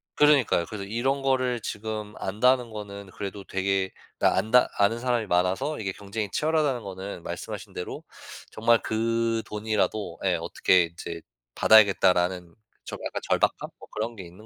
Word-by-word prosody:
그러니까요. 140 Hz, -, +4 dB
그래서 105 Hz, -2 st, -6 dB
이런 130 Hz, +7 st, -1 dB
거를 130 Hz, -2 st, +1 dB
지금 105 Hz, 0 st, -5 dB
안다는 125 Hz, +5 st, +2 dB
거는 100 Hz, -2 st, -8 dB
그래도 100 Hz, 0 st, -6 dB
되게 95 Hz, 0 st, 0 dB, 0.3 s
나 -, -, +3 dB
안다 125 Hz, +3 st, +4 dB
아는 100 Hz, +3 st, +3 dB
사람이 120 Hz, -2 st, 0 dB
많아서 95 Hz, -, 0 dB
이게 95 Hz, -3 st, -2 dB
경쟁이 100 Hz, +1 st, -5 dB
치열하다는 150 Hz, -, 0 dB
거는 95 Hz, -2 st, -7 dB
말씀하신 -, -, -6 dB
대로 -, -, -6 dB, 0.5 s
정말 115 Hz, +1 st, +3 dB
그 115 Hz, +1 st, 0 dB
돈이라도 105 Hz, 0 st, -2 dB
예 -, -, +3 dB
어떻게 90 Hz, -1 st, +3 dB
이제 85 Hz, 0 st, -7 dB, 0.3 s
받아야겠다라는 90 Hz, -4 st, +4 dB, 0.3 s
좀 -, -, -7 dB
약간 -, -, -4 dB
절박함 -, -, +1 dB
뭐 -, -, -13 dB
그런 115 Hz, +2 st, -3 dB
게 95 Hz, -, -8 dB
있는 90 Hz, +6 st, -14 dB
105 Hz, 355 characters per minute, -26 LUFS, 95-120 Hz, 0.5 s, 그러니까요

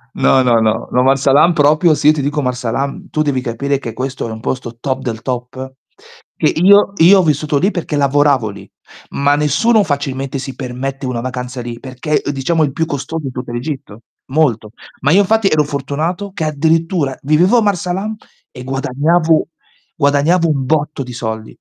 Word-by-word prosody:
No, 130 Hz, -, +3 dB
no, 120 Hz, -2 st, +3 dB
no, 110 Hz, 0 st, 0 dB
no 125 Hz, +1 st, +2 dB
Marsa 135 Hz, +1 st, +2 dB
Alam 165 Hz, +5 st, +5 dB
proprio, 155 Hz, +2 st, +4 dB
sì, 150 Hz, +1 st, +4 dB
ti 155 Hz, -2 st, -1 dB
dico 145 Hz, +2 st, -1 dB
Marsa 125 Hz, -3 st, -2 dB
Alam, 140 Hz, +4 st, -3 dB
tu 155 Hz, -, -1 dB
devi 140 Hz, -4 st, 0 dB
capire 135 Hz, +3 st, -2 dB
che 115 Hz, -5 st, -6 dB
questo 130 Hz, 0 st, -4 dB
è -, -, -6 dB
un 110 Hz, -, -7 dB
posto 120 Hz, -1 st, -4 dB
top 130 Hz, 0 st, -2 dB
del 115 Hz, -4 st, -4 dB
top 130 Hz, +1 st, -5 dB, 0.7 s
che -, -, +2 dB
io 200 Hz, +4 st, +5 dB
io 190 Hz, +4 st, +7 dB
ho -, -, +3 dB
vissuto 150 Hz, -1 st, 0 dB
lì 195 Hz, +6 st, +2 dB
perché 170 Hz, -4 st, -4 dB
lavoravo 140 Hz, -4 st, +2 dB
lì, 100 Hz, -, -11 dB, 0.4 s
ma 145 Hz, +1 st, +2 dB
nessuno 200 Hz, -, +2 dB
facilmente 140 Hz, -2 st, -3 dB
si 130 Hz, -1 st, -7 dB
permette 135 Hz, +2 st, -5 dB
una 125 Hz, -2 st, -3 dB
vacanza 125 Hz, 0 st, -5 dB
lì 120 Hz, 0 st, -7 dB
perché 130 Hz, +4 st, -2 dB
diciamo 155 Hz, +4 st, 0 dB
è -, -, +4 dB
il 135 Hz, -, -6 dB
più 160 Hz, +2 st, -1 dB
costoso 155 Hz, +1 st, -5 dB
in 130 Hz, -, -5 dB
tutta 125 Hz, -1 st, -6 dB
l'Egitto, 125 Hz, -4 st, -6 dB, 0.3 s
molto. 120 Hz, -8 st, +1 dB, 0.3 s
Ma 140 Hz, -, +2 dB
io 190 Hz, -, +5 dB
infatti 215 Hz, +1 st, +2 dB
ero 155 Hz, -1 st, +3 dB
fortunato 155 Hz, +8 st, -3 dB
che 165 Hz, -, -4 dB
addirittura 160 Hz, -1 st, 0 dB
vivevo 165 Hz, -, +3 dB
a -, -, +4 dB
Marsa 190 Hz, -4 st, 0 dB
Alam 205 Hz, +4 st, -3 dB, 0.4 s
e 125 Hz, -, -10 dB
guadagnavo, 145 Hz, +5 st, +1 dB, 0.5 s
guadagnavo 155 Hz, +4 st, +2 dB
un 140 Hz, -4 st, -1 dB
botto 150 Hz, 0 st, -1 dB
di 125 Hz, -1 st, -9 dB
soldi. 110 Hz, -2 st, -4 dB
140 Hz, 190 wpm, -16 LUFS, 130-160 Hz, 0.7 s, io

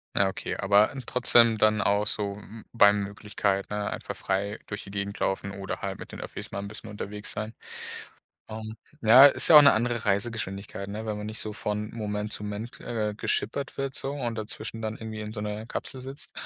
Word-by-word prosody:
Ja, 100 Hz, -, +4 dB
okay, 95 Hz, -, -4 dB
aber 100 Hz, +2 st, +4 dB
n 135 Hz, -2 st, -7 dB
trotzdem 115 Hz, -2 st, +4 dB
dann 110 Hz, 0 st, +3 dB
auch 100 Hz, +1 st, +2 dB
so 100 Hz, -2 st, 0 dB
m 105 Hz, +2 st, -12 dB
bei 105 Hz, -3 st, +7 dB
Möglichkeit, 100 Hz, -1 st, -2 dB
ne, 105 Hz, -1 st, -2 dB
einfach -, -, -5 dB
frei 100 Hz, +2 st, -2 dB
durch 105 Hz, 0 st, -5 dB
die 100 Hz, -, -10 dB
Gegend 100 Hz, +1 st, -4 dB
laufen 95 Hz, 0 st, -1 dB
oder 95 Hz, -1 st, -5 dB
halt -, -, -4 dB
mit -, -, -9 dB
den -, -, -8 dB
Öffis -, -, -6 dB
mal -, -, -4 dB
'n 100 Hz, -, -5 dB
bisschen 105 Hz, +1 st, -9 dB
unterwegs 105 Hz, 0 st, -5 dB
sein. 110 Hz, +1 st, -5 dB, 1.0 s
Ähm, 110 Hz, 0 st, -7 dB, 0.3 s
ja, 120 Hz, +5 st, +9 dB
ist 145 Hz, -, +8 dB
ja 160 Hz, -, +9 dB
auch -, -, +9 dB
'ne 140 Hz, -, +7 dB
andere 115 Hz, 0 st, -1 dB
Reisegeschwindigkeit, 100 Hz, -1 st, -2 dB
ne, 105 Hz, +2 st, -5 dB
wenn 105 Hz, -1 st, -3 dB
man 105 Hz, -, -5 dB
nicht 110 Hz, +1 st, -4 dB
so 110 Hz, -, -2 dB
von 105 Hz, +1 st, -3 dB
Moment 105 Hz, -1 st, -3 dB
zu 105 Hz, -, -1 dB
Moment, 105 Hz, +4 st, -6 dB
äh, 110 Hz, -3 st, -2 dB
geschippert 135 Hz, +5 st, -2 dB
wird 135 Hz, -1 st, -3 dB
so 135 Hz, -, -1 dB
und 120 Hz, -5 st, -3 dB
dazwischen 110 Hz, +1 st, -5 dB
dann 110 Hz, 0 st, -4 dB
irgendwie 110 Hz, -1 st, -7 dB
in 105 Hz, +1 st, -6 dB
so 105 Hz, -, -4 dB
'ner 105 Hz, +1 st, -5 dB
Kapsel 130 Hz, +2 st, -2 dB
sitzt, 135 Hz, +3 st, -6 dB
105 Hz, 210 wpm, -27 LUFS, 100-110 Hz, 1.0 s, ja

